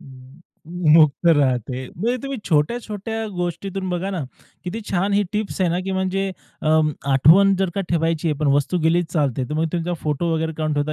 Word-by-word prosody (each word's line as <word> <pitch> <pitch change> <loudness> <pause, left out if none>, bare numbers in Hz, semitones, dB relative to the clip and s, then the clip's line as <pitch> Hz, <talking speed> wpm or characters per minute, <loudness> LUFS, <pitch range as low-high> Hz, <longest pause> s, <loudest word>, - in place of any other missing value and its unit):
म 130 +2 -15 0.5
मुक्त 155 0 +4
राहते. 130 -5 +2
म्हणजे 235 +7 0
तुम्ही 275 -2 -4
छोट्या-छोट्या 220 +6 -1
गोष्टीतून 185 +2 -3
बघा 180 +2 -2
ना, 185 -4 -3 0.4
किती 195 +6 -4
छान 195 +2 0
ही 205 +1 +3
टिप्स 210 -2 -3
आहे 175 -2 +2
ना, 175 - 0
की 195 - -2
म्हणजे 190 +1 -1 0.3
अ, - - 0 0.4
आठवण 185 +9 +6
जर 190 -2 0
का 200 - -1
ठेवायची 165 -1 0
आहे 150 - 0
पण 150 - 0
वस्तू 145 +5 +1
गेलीच 170 +1 +2
चालते 140 -5 0
तर 150 - -3
मग 160 +1 +1
तुमचा 175 0 -2
फोटो 155 +3 -1
वगैरे 160 0 -1
काढून 155 -1 -1
ठेवता, 145 +1 -1
170 Hz, 185 wpm, -21 LUFS, 150-195 Hz, 0.5 s, आठवण